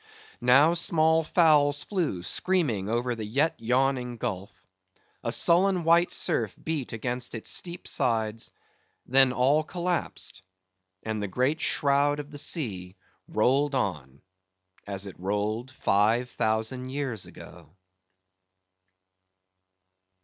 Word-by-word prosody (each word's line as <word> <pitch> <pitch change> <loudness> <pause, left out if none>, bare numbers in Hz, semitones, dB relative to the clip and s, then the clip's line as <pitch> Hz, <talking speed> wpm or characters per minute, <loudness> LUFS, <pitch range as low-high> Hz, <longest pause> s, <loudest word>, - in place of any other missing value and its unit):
Now 135 +7 +5
small 160 -1 +2
fowls 150 -3 +3
flew 160 - -2
screaming 125 - +1
over 120 +2 0
the 115 -2 -6
yet 140 +10 +1
yawning 125 +1 0
gulf; 95 -2 -4 0.7
a - - -1
sullen 180 +1 +3
white 170 +2 +4
surf 115 - -1
beat 155 -5 -3
against 120 +2 -3
its 115 - -3
steep 175 0 -4
sides; 110 -1 -1 0.6
then 135 0 +4
all 135 +5 +3
collapsed, 175 - -3 0.6
and 110 -1 -3
the 105 - -2
great 130 - 0
shroud 145 0 +2
of 145 0 -8
the 145 - -2
sea 95 - -2 0.3
rolled 135 +6 +1
on 75 - -3 0.6
as 100 0 -3
it 95 -3 -10
rolled 105 +6 -2
five 115 0 +1
thousand 110 +4 -1
years 130 -7 -3
ago. 85 -4 -13
125 Hz, 115 wpm, -27 LUFS, 110-150 Hz, 0.7 s, Now